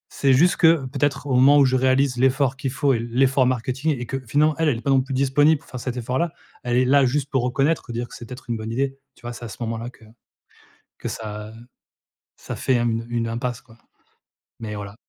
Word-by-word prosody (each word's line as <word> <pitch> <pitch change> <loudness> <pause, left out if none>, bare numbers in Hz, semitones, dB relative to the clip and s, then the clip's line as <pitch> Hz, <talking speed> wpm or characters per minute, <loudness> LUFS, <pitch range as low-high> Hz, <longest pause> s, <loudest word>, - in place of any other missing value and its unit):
c'est 140 - +2
juste 170 +7 +4
que 160 -5 +4
peut-être 140 +1 -1
au 140 - -2
moment 135 +3 +6
où 140 - +6
je 130 0 +1
réalise 130 0 +2
l'effort 135 +1 +2
qu'il 135 0 -3
faut 140 +1 +1
et 115 - 0
l'effort 130 +3 +2
marketing 130 +4 -1
et 120 - -4
que 135 +3 -4
finalement 150 +6 +3
elle, 160 -2 +3
elle 125 - 0
est - - -8
pas 140 - 0
non 135 -1 +4
plus 135 +1 -6
disponible 145 +3 +3
pour - - -23
faire 130 - -6
cet 125 0 -4
effort-là, 130 +8 -1 0.3
elle 120 0 -1
est 130 - +3
là 140 +2 +4
juste 140 +2 0
pour 135 - +1
reconnaître, 135 +6 +1
pour 120 - -9
dire 120 +1 -3
que - - -16
c'est 120 - -9
peut-être 125 +3 -10
une 115 - -1
bonne 110 +1 -6
idée, 135 +3 -1 0.2
tu - - -23
vois? 120 0 -5
C'est 120 0 -9
à - - -5
ce - - -10
moment-là 115 +1 -3
que 120 -2 -19 0.9
que - - -7
ça 105 -1 -6 0.8
ça - - -7
fait, 130 - 0
hem, 115 -1 0
une 120 -1 -1
impasse, 120 +1 -3
quoi. 115 -2 -20 0.8
Mais 105 -2 -5
voilà. 100 -1 -7
130 Hz, 240 wpm, -22 LUFS, 120-140 Hz, 0.9 s, moment